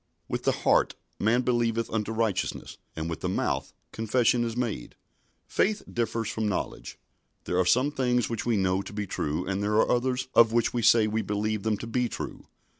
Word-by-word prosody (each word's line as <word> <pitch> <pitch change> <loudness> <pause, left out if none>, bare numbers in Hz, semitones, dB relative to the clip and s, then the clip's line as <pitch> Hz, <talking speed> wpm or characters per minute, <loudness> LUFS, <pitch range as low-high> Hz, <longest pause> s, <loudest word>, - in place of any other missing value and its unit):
"With - - -3
the - - +4
heart - - +3 0.2
man 120 +4 +2
believeth 115 -2 +1
unto 110 -1 -1
righteousness; 110 -3 -2 0.2
and 80 0 -3
with 85 -2 -4
the - - -2
mouth - - -1 0.2
confession 120 +2 +2
is 115 0 -3
made." 115 - -3 0.5
Faith 215 +1 0
differs 115 -1 -2
from 110 -1 -1
knowledge. 100 - -4 0.5
There 90 - -1
are 90 - +3
some 130 +8 +3
things 125 -3 +1
which 115 -2 -3
we 120 -3 +1
know 95 0 +1
to 100 - -9
be 105 0 -3
true, 75 -5 -2
and 95 +1 -2
there 105 +1 0
are 110 - +3
others 125 +1 0
of 115 -1 +6
which 120 -1 +2
we 120 - 0
say 115 0 +5
we 110 +1 0
believe 105 0 -1
them 110 0 0
to - - -7
be 120 +1 0
true. - - -7
115 Hz, 195 wpm, -27 LUFS, 105-120 Hz, 0.5 s, of